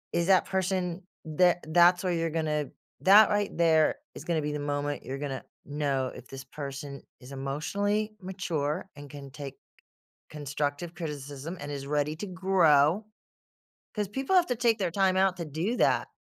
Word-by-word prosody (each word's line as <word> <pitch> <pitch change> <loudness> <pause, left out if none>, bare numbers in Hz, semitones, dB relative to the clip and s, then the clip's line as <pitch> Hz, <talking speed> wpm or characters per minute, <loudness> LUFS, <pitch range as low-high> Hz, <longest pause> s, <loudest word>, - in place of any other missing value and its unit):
Is 170 0 +1
that 190 -1 +5
person 185 -1 -1 0.2
tha 175 +3 +4
that's 175 +3 +5
where 180 -1 0
you're 165 -1 0
gonna 155 -3 -1 0.3
that 205 +2 +8
right 205 -1 0
there, 160 -2 +4 0.2
is - - -8
gonna 165 -1 0
be 150 0 -2
the 150 - -3
moment 145 0 -2
you're 135 - -4
gonna 135 -2 -4 0.2
know 140 -3 -1
if 125 - -11
this 135 +1 -8
person 140 0 -7 0.2
is 125 +1 -13
emotionally 200 +11 -2
mature, 180 -3 -3
and 145 0 -11
can 140 -1 -10
take 140 0 -8 0.7
constructive 145 +2 -3
criticism, 150 +1 -6
and 145 0 -6
is 140 -1 -5
ready 150 +1 0
to 205 - -5
grow, 180 -1 +3 0.9
'cause 210 -2 -1
people 265 - -1
have 360 -2 +5
to 245 - 0
take 235 -1 +2
their 185 -4 0
time 190 0 +2
out 190 -1 +3
to 170 - -4
do 160 - -2
that, - - +2
160 Hz, 170 wpm, -28 LUFS, 145-185 Hz, 0.9 s, that